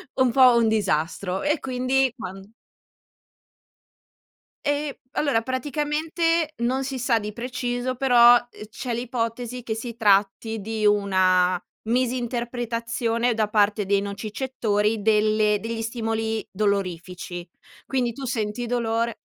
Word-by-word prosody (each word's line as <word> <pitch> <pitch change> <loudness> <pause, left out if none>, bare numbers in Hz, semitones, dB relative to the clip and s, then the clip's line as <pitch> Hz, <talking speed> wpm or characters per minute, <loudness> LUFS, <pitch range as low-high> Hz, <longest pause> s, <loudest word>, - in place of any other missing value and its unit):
un 260 -2 +3
po' 255 -1 +6
un 230 -1 +3
disastro 185 -2 0
e 295 +1 +1
quindi 255 0 +1
quan 195 -5 -7 2.2
Ehm, 290 0 0 0.2
allora 280 -7 +1
praticamente 305 +5 -1
non 260 +2 0
si 270 -1 -4
sa 240 -2 +2
di 210 0 -6
preciso, 245 +1 -3
però, 245 -2 +7
uhm, 240 -3 -3
c'è 240 +2 -5
l'ipotesi 240 0 -3
che 225 -2 -3
si 230 +1 -6
tratti 210 +1 +2
di 215 +1 -2
una 185 -3 +3 0.3
misinterpretazione 240 -1 -1
da 215 -2 0
parte 205 -1 +2
dei 200 0 +2
nocicettori 210 +1 -1
delle 215 0 +3
degli 225 0 -4
stimoli 225 -1 -2
dolorifici. 180 -3 -2 0.4
Quindi 245 -3 -1
tu 275 - -8
senti 230 -1 -2
dolore 230 -1 -1
230 Hz, 115 wpm, -24 LUFS, 210-250 Hz, 2.2 s, però